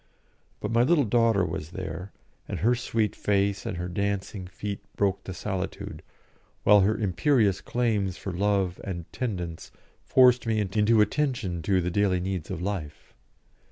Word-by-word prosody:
But - - -3
my 115 +1 +4
little 145 +4 +4
daughter 115 -3 +3
was 75 -2 -4
there, 95 +1 -6 0.4
and - - -4
her 115 +5 +4
sweet 115 -3 -1
face 100 -1 0
and 90 0 -4
dancing 100 -1 -2
feet 100 +2 -5 0.2
broke 100 -1 0
the - - -5
solitude, 95 0 -4 0.6
while 105 0 +7
her 105 +3 +2
imperious 105 - +2
claims 105 -6 0
for 95 - -5
love 95 -1 0
and 85 -4 -5
tendance 90 -9 -4 0.3
forced 125 -2 +5
me 110 -1 +1
into 105 +2 +3
attention 105 - 0
to 95 +3 +2
the 90 +1 -2
daily 95 -1 +2
needs 90 -3 -3
of 85 - -4
life. 90 -7 -5
100 Hz, 150 wpm, -27 LUFS, 90-110 Hz, 0.6 s, while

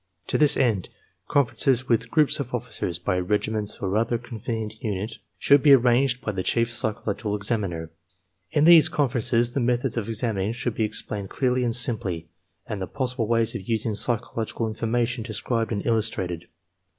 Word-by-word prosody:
To - - +2
this 150 -2 +5
end, 110 -8 +1 0.4
conferences 130 -2 +2
with 115 -1 +1
groups 150 +1 +3
of - - -3
officers, 85 - -3
by 90 +1 -1
regiments 105 +2 -1
or 100 -3 -2
other 115 +1 +1
convenient 110 -2 -6
unit, 105 +1 -3 0.2
should 140 -1 +5
be 145 0 +7
arranged 125 0 +3
by 110 - -2
the 95 -2 -3
chief 115 +4 0
psychological 105 -3 -1
examiner. 100 -6 -3 0.6
In 150 -2 +2
these 165 -1 +8
con 145 -3 +1
ferences 120 0 +1
the - - 0
methods 125 0 0
of 110 -3 -2
examining 110 -2 -1
should 120 0 -3
be 110 - 0
explained 105 -2 -4
clearly 125 -1 0
and 115 -2 0
simply, 95 -9 -1 0.4
and 105 -3 -5
the 95 - -3
possible 125 -4 -2
ways 115 0 +1
of 105 -4 -7
using 110 -1 0
psychological 115 +1 -2
in 110 - -4
formation 120 +2 -1
described 115 +1 -1
and 100 -3 -2
illustrated. 105 -7 0
115 Hz, 170 wpm, -25 LUFS, 105-125 Hz, 0.6 s, these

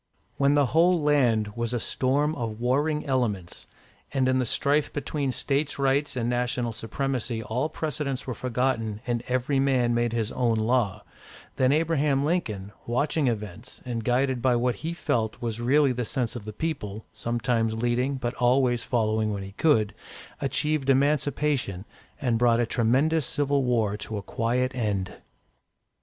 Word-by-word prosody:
When 140 +1 +3
the 145 -1 +4
whole 175 +2 +5
land 125 -8 +2
was 115 +2 -3
a 120 - 0
storm 140 +6 0
of 115 -5 -4
warring 145 +5 +1
elements, 115 - -2 0.4
and 130 -2 +1
in 130 0 +2
the 125 - 0
strife 145 +6 +1
between 145 -1 -2
States' 140 +3 0
Rights 140 +1 +1
and 120 -2 -1
National 120 -1 0
Supremacy 120 0 -3
all 125 +8 -1
precedents 140 -4 -3
were 125 - -3
forgotten 115 -3 -1
and 120 -1 -1
every 130 +2 +1
man 130 -3 +2
made 120 0 +1
his 115 -1 -1
own 120 -3 +1
law, 110 -3 +1 0.5
then 130 0 +3
Abraham 150 -3 +2
Lincoln, 110 - -2 0.2
watching 145 +4 +1
events, 110 +1 -4
and 120 -2 -3
guided 125 +1 +1
by 125 -1 +3
what 120 +1 0
he 165 +2 -3
felt 110 -9 -1
was 115 -1 -3
really 140 +3 +4
the 125 0 -2
sense 120 +1 -2
of 115 -4 -7
the 110 - -5
people, 110 -6 -4
sometimes 115 0 0
leading, 120 +4 0
but 120 -2 -3
always 125 -1 +2
following 110 -3 0
when 100 -1 -3
he 95 - -8
could, 110 -3 +2 0.5
achieved 140 +1 0
Emancipation, 140 -7 +1 0.3
and 120 -4 0
brought 120 -1 +4
a 120 - +2
tremendous 130 +7 +2
civil 145 -2 +1
war 115 -5 +1
to 110 0 -5
a 100 - -5
quiet 125 +5 -1
end. 105 -6 -2
125 Hz, 160 wpm, -26 LUFS, 115-140 Hz, 0.5 s, whole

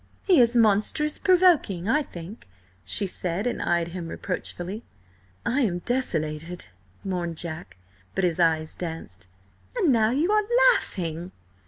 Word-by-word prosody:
"He 365 -7 +5
is 240 0 +3
monstrous 225 +8 +2
provoking, 345 - +3
I 295 +7 +3
think," 175 - -10 0.4
she 95 - -2
said, 185 +1 -3
and 245 - -1
eyed 170 -1 +1
him 170 -1 -6
reproachfully. 185 +3 -5 0.6
"I 270 +4 +1
am 190 -8 +1
desolated," 170 -7 -2 0.4
mourned 175 -4 -3
Jack, 160 - -7 0.4
but 195 - 0
his 175 -1 +1
eyes 160 -2 +2
danced. 160 - -7 0.5
"And 380 - +3
now 220 -2 +3
you 300 - +1
are 425 0 +3 0.3
laughing!" 170 - -4
185 Hz, 135 wpm, -25 LUFS, 170-245 Hz, 0.6 s, He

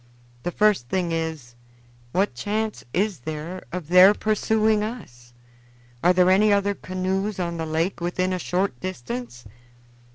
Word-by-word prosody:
The 175 - -2
first 205 - +2
thing 180 -3 -1
is, 160 -7 -3 0.6
what 190 -2 +1
chance 215 - -3
is 195 - 0
there 155 +7 -6
of 180 -4 -5
their 185 +3 +8
pursuing 215 0 +1
us? 120 - -8 0.7
Are 180 - +6
there 180 0 +4
any 210 +3 +4
other 200 0 +2
canoes 190 +2 -3
on 170 -1 -2
the 160 -1 -3
lake 165 +4 -1
within 185 +2 -1
a 185 - -2
short 180 -6 -1
distance?" 120 -8 -6
185 Hz, 140 wpm, -24 LUFS, 160-200 Hz, 0.7 s, their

